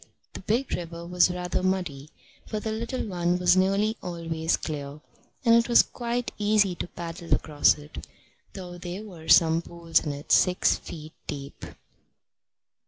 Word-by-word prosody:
The -, -, -7 dB
big 235 Hz, +7 st, -1 dB
river 170 Hz, -1 st, -5 dB
was 180 Hz, +1 st, +3 dB
rather 180 Hz, 0 st, -2 dB
muddy, 175 Hz, -7 st, -2 dB, 0.4 s
but 215 Hz, -1 st, -3 dB
the 220 Hz, -, -2 dB
little 230 Hz, +4 st, -3 dB
one 175 Hz, -2 st, 0 dB
was 180 Hz, 0 st, +4 dB
nearly 195 Hz, +4 st, +2 dB
always 165 Hz, -2 st, -2 dB
clear, 145 Hz, -2 st, -6 dB, 0.5 s
and 230 Hz, -, +6 dB
it 235 Hz, +1 st, +4 dB
was 235 Hz, -, +7 dB
quite 240 Hz, 0 st, -3 dB
easy 205 Hz, -2 st, +3 dB
to 175 Hz, -, -5 dB
paddle 170 Hz, -1 st, -8 dB
across 150 Hz, -1 st, +3 dB
it, 150 Hz, 0 st, -10 dB, 0.5 s
though 180 Hz, -2 st, -8 dB
there 180 Hz, +4 st, -6 dB
were 175 Hz, -7 st, -11 dB
some 165 Hz, 0 st, +6 dB
pools 170 Hz, -1 st, 0 dB
in 150 Hz, -, -2 dB
it 145 Hz, +1 st, -7 dB
six 180 Hz, -1 st, +4 dB
feet 155 Hz, -1 st, -9 dB
deep. 140 Hz, -1 st, -7 dB
175 Hz, 155 wpm, -26 LUFS, 165-200 Hz, 0.5 s, was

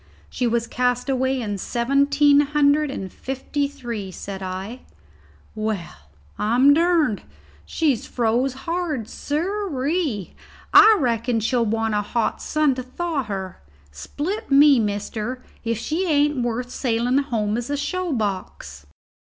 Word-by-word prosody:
"She 250 Hz, -, -1 dB
was 235 Hz, 0 st, 0 dB
cast 250 Hz, +2 st, -1 dB
away 260 Hz, 0 st, +1 dB
in 205 Hz, -4 st, -3 dB
seventeen 280 Hz, +6 st, +3 dB
hundred 295 Hz, 0 st, +3 dB
and 195 Hz, -9 st, -6 dB
fifty 270 Hz, +2 st, -3 dB
three," 240 Hz, -8 st, -6 dB
said 195 Hz, +1 st, -7 dB
I. 190 Hz, +6 st, -5 dB, 0.7 s
"Well, 215 Hz, -5 st, -3 dB, 0.4 s
I'm 245 Hz, +6 st, +5 dB
durned. 325 Hz, -, +2 dB, 0.5 s
She's 290 Hz, -8 st, 0 dB
froze 245 Hz, +2 st, 0 dB
hard, 330 Hz, -9 st, -2 dB
sirree; 305 Hz, -, -2 dB, 0.4 s
I 430 Hz, +2 st, +8 dB
reckon 235 Hz, -3 st, 0 dB
she'll 235 Hz, +1 st, +1 dB
want 225 Hz, 0 st, 0 dB
a 210 Hz, -, +1 dB
hot 225 Hz, +2 st, -2 dB
sun 305 Hz, -3 st, +1 dB
to 255 Hz, -, -4 dB
thaw 305 Hz, +4 st, -3 dB
her. 190 Hz, -3 st, -6 dB, 0.3 s
Split 320 Hz, -, -5 dB
me, 280 Hz, -1 st, +6 dB
mister, 215 Hz, +4 st, -3 dB, 0.2 s
if 230 Hz, -1 st, -1 dB
she 330 Hz, -, -2 dB
ain't 295 Hz, -3 st, +2 dB
worth 240 Hz, +1 st, -2 dB
sailing 245 Hz, +1 st, +1 dB
home 220 Hz, -7 st, -1 dB
as 240 Hz, +2 st, -4 dB
a 290 Hz, -, -1 dB
show 360 Hz, +5 st, -2 dB
box." 185 Hz, -, -4 dB
255 Hz, 130 wpm, -22 LUFS, 220-290 Hz, 0.7 s, I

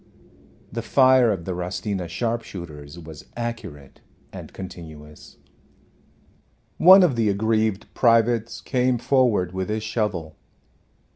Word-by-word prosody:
The -, -, -4 dB
fire 130 Hz, -3 st, +4 dB
of 90 Hz, -5 st, -4 dB
the 95 Hz, -, -3 dB
Rostina 90 Hz, +1 st, -4 dB
sharpshooters 85 Hz, -7 st, -5 dB
was 80 Hz, -3 st, -11 dB
accurate 105 Hz, -, -7 dB, 0.3 s
and -, -, -9 dB
continuous. 80 Hz, -5 st, -11 dB, 1.4 s
One 185 Hz, +2 st, +8 dB
of 155 Hz, -8 st, +2 dB
the 115 Hz, -2 st, +1 dB
aggrieved 110 Hz, 0 st, 0 dB
privates 115 Hz, -1 st, +2 dB
came 125 Hz, -1 st, 0 dB
forward 120 Hz, -8 st, +1 dB
with 95 Hz, +2 st, -4 dB
his 110 Hz, 0 st, -2 dB
shovel. 105 Hz, -8 st, -3 dB
105 Hz, 110 wpm, -23 LUFS, 85-120 Hz, 1.4 s, One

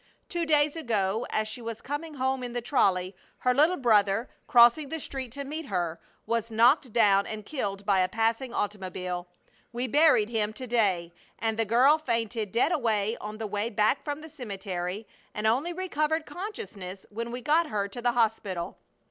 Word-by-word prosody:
Two 345 Hz, -1 st, -2 dB
days 300 Hz, -1 st, +3 dB
ago, 220 Hz, -7 st, -1 dB
as 215 Hz, 0 st, 0 dB
she 230 Hz, +3 st, -6 dB
was 230 Hz, -1 st, -5 dB
coming 295 Hz, +4 st, -5 dB
home 265 Hz, 0 st, 0 dB
in 245 Hz, -1 st, -5 dB
the 245 Hz, -, -1 dB
trolley, 195 Hz, -7 st, +1 dB, 0.2 s
her 250 Hz, -, +2 dB
little 310 Hz, +7 st, +4 dB
brother, 215 Hz, -2 st, +2 dB, 0.2 s
crossing 240 Hz, +4 st, +6 dB
the 320 Hz, -, -3 dB
street 265 Hz, -4 st, -5 dB
to 280 Hz, +1 st, -4 dB
meet 300 Hz, +2 st, -5 dB
her, 175 Hz, -4 st, -2 dB, 0.3 s
was 230 Hz, -1 st, -1 dB
knocked 240 Hz, +4 st, +4 dB
down 200 Hz, -3 st, +4 dB
and 215 Hz, -1 st, -6 dB
killed 200 Hz, -9 st, -4 dB
by 200 Hz, -2 st, +3 dB
a 185 Hz, 0 st, +2 dB
passing 225 Hz, +4 st, 0 dB
automobile. 185 Hz, -4 st, -3 dB, 0.4 s
We 240 Hz, +1 st, -2 dB
buried 285 Hz, -5 st, +4 dB
him 215 Hz, -2 st, -1 dB
to 255 Hz, +3 st, -7 dB
day, 195 Hz, -8 st, +1 dB, 0.2 s
and 225 Hz, 0 st, -1 dB
the 225 Hz, 0 st, 0 dB
girl 255 Hz, +8 st, +5 dB
fainted 230 Hz, -6 st, -2 dB
dead 245 Hz, +8 st, +2 dB
away 225 Hz, -, +1 dB
on 210 Hz, +1 st, -6 dB
the 220 Hz, -, -4 dB
way 210 Hz, +2 st, -2 dB
back 215 Hz, +4 st, +1 dB
from 290 Hz, 0 st, -4 dB
the 320 Hz, -, -10 dB
cemetery 195 Hz, -, -5 dB, 0.3 s
and 210 Hz, -, -3 dB
only 260 Hz, +10 st, +2 dB
recovered 320 Hz, -3 st, -1 dB
consciousness 200 Hz, -, -7 dB
when 230 Hz, +3 st, -4 dB
we 245 Hz, +1 st, -5 dB
got 310 Hz, +5 st, +3 dB
her 205 Hz, -4 st, -1 dB
to 240 Hz, +5 st, -7 dB
the 240 Hz, 0 st, +2 dB
hospital. 215 Hz, -7 st, -1 dB
230 Hz, 180 wpm, -28 LUFS, 205-275 Hz, 0.4 s, crossing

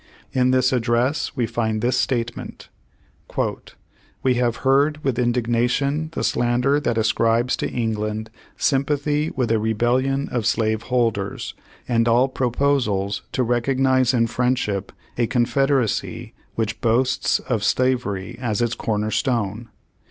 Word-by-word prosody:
In 130 Hz, -1 st, +3 dB
this 130 Hz, +1 st, +3 dB
address 120 Hz, +3 st, 0 dB
we 125 Hz, -4 st, +1 dB
find 110 Hz, -1 st, -1 dB
this 120 Hz, +2 st, +1 dB
statement: 120 Hz, -2 st, -3 dB, 1.5 s
"We 130 Hz, -, +3 dB
have 120 Hz, -1 st, +1 dB
heard 145 Hz, +3 st, +3 dB
with 130 Hz, -3 st, 0 dB
indignation 125 Hz, +5 st, +1 dB
the -, -, -3 dB
slander 125 Hz, +4 st, +2 dB
that 120 Hz, -6 st, -1 dB
ascribes 115 Hz, +2 st, +2 dB
to -, -, -2 dB
England 110 Hz, -1 st, -2 dB, 0.3 s
sympathy 145 Hz, +2 st, +1 dB
with 125 Hz, -4 st, 0 dB
a 115 Hz, -, +3 dB
rebellion 125 Hz, +5 st, +1 dB
of 120 Hz, -4 st, -1 dB
slave 110 Hz, -1 st, +1 dB
holders, 115 Hz, -5 st, -1 dB, 0.3 s
and 115 Hz, -1 st, +2 dB
all 120 Hz, +3 st, +4 dB
proposals 125 Hz, -6 st, 0 dB
to 130 Hz, -, +1 dB
recognize 130 Hz, +1 st, +2 dB
in 120 Hz, -3 st, +2 dB
friendship 115 Hz, -5 st, -1 dB, 0.3 s
a 120 Hz, -, +2 dB
confederacy 125 Hz, 0 st, 0 dB, 0.2 s
which 110 Hz, -1 st, -2 dB
boasts 125 Hz, +2 st, +2 dB
of 115 Hz, -5 st, -2 dB
slavery 120 Hz, -3 st, 0 dB
as 110 Hz, -5 st, -1 dB
its 120 Hz, -1 st, +1 dB
corner 110 Hz, -1 st, -2 dB
stone. 110 Hz, -1 st, -1 dB
120 Hz, 125 wpm, -22 LUFS, 115-130 Hz, 1.5 s, all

